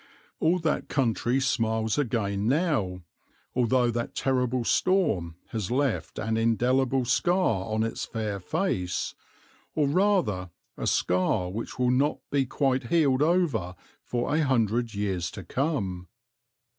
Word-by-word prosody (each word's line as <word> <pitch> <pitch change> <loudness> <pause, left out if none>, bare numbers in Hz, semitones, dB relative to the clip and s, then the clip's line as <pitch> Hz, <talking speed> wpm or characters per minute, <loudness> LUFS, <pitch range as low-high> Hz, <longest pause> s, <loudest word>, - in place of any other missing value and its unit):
All 165 +3 +3
that 160 -3 -1
country 125 -1 +1
smiles 110 -3 0
again 105 -6 -1
now, 125 - 0 0.5
although 125 0 +2
that 120 0 -3
terrible 125 -2 0
storm 130 - +1
has 110 -5 -3
left 135 -1 -1
an 110 0 -1
indelible 125 +3 +2
scar 135 - +1
on 110 0 +1
its 115 - -3
fair 105 -3 -3
face, 90 - -1 0.6
or 150 -2 +2
rather 155 - +1 0.3
a - - -4
scar 90 0 +1
which 110 +4 -5
will 125 -1 +2
not 140 +4 +2
be 135 -2 +1
quite 130 -2 0
healed 140 -3 +3
over 150 - +1 0.3
for 120 +3 -2
a 160 - +3
hundred 120 -4 +1
years 95 -4 -1
to - - -8
come. 100 - -2
120 Hz, 130 wpm, -27 LUFS, 105-140 Hz, 0.6 s, All